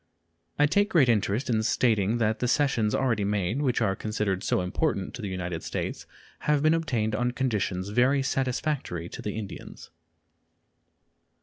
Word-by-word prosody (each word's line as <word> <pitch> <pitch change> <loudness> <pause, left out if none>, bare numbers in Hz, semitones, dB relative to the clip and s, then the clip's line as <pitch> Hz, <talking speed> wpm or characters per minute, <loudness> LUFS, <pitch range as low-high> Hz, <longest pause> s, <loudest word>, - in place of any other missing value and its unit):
I 145 - +5
take 205 +7 +2
great 155 - +4
interest 105 +2 +1
in 115 -4 +1
stating 110 -1 +2
that 110 -1 0
the 125 - 0
cessions 120 -5 +2
already 115 -6 +1
made, 105 +5 0
which 130 -4 +1
are 95 - +1
considered 105 -3 -2
so - - +1
important 95 - -1
to - - -7
the 105 - -3
United 90 -3 -4
States, - - -4 0.4
have 150 -1 +3
been 155 +1 +5
obtained 120 -10 0
on 120 +3 0
conditions 100 -7 -1
very 130 +5 +3
satisfactory 130 - -2
to - - -8
the 105 0 -4
Indians. 100 -5 -8
110 Hz, 160 wpm, -27 LUFS, 100-135 Hz, 0.4 s, I